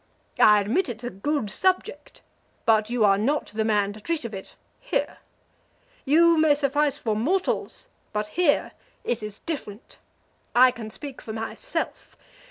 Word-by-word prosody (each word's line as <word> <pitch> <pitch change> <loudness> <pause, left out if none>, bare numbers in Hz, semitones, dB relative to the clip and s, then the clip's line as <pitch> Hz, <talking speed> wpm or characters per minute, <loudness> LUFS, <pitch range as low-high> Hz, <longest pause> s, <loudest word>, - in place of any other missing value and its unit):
I 210 -1 +7
admit 240 - 0
it's 230 0 -6
a 245 - -4
good 215 +3 -2
subject, 375 - -1 0.4
but 220 -1 +3
you 240 -3 +2
are 195 -1 +4
not 280 +8 0
the 220 +1 0
man 205 -2 +1
to 215 - -12
treat 320 +3 -2
of 225 - -6
it 190 -1 -9 0.2
here. - - -2 0.9
You 330 +3 +5
may 310 -2 +5
suffice 290 0 +1
for 220 -6 -1
mortals, 345 - -1 0.2
but 210 0 -1
here 345 -5 +2 0.3
it 235 -2 -2
is 210 0 -7
different. 260 -9 -7 0.6
I 255 +1 +7
can 225 -3 -8
speak 275 +4 -8
for 220 - -7
myself. 225 - -4
240 Hz, 155 wpm, -25 LUFS, 215-300 Hz, 0.9 s, I